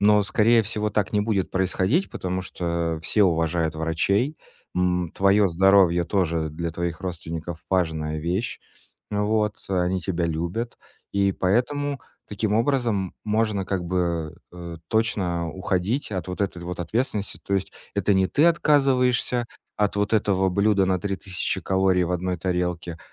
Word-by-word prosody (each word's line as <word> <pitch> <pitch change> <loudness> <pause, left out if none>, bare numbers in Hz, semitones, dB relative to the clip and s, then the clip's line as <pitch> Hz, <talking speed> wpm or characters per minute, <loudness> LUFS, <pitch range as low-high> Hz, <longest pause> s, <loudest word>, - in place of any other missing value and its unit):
Но, 105 0 +5
скорее 115 +2 +4
всего, 105 0 -2
так 105 0 0
не 105 - +2
будет 105 -3 0
происходить, 95 - +1
потому 95 0 -3
что 85 -2 -2
все 105 +6 +2
уважают 80 -1 +1
врачей. 100 - 0 0.4
М, 90 -2 0
твоё 100 +1 +4
здоровье 95 -1 +4
тоже 85 -4 0
для 85 +2 -3
твоих 85 0 -3
родственников 85 -2 -5
важная 80 -4 0
вещь. 90 +9 -2 0.5
Вот. 105 0 +1
Они 90 -1 0
тебя 85 0 -1
любят, 85 +9 -3 0.3
и 100 -1 +2
поэтому 135 +10 0 0.3
таким 105 +1 -1
образом 115 -6 +1
можно 105 -2 0
как 95 -2 -2
бы, 85 -3 -1 0.2
э, 85 -1 -8
точно 90 -7 0
уходить 95 - -1
от 95 - -3
вот 90 - -5
этой 90 -3 -2
вот 90 0 -5
ответственности. 105 - -2
То 100 - -1
есть 95 -1 -1 0.2
это 100 - +2
не 95 0 +3
ты 150 - +3
отказываешься 130 -6 +3 0.3
от 105 -1 +1
вот 100 +1 0
этого 95 -3 +2
блюда 100 +1 +3
на 95 -1 +1
3000 95 -2 -2
калорий 95 -1 +2
в 90 - -2
одной 90 +1 -1
тарелке, 90 -1 -2
95 Hz, 145 wpm, -24 LUFS, 85-105 Hz, 0.5 s, Но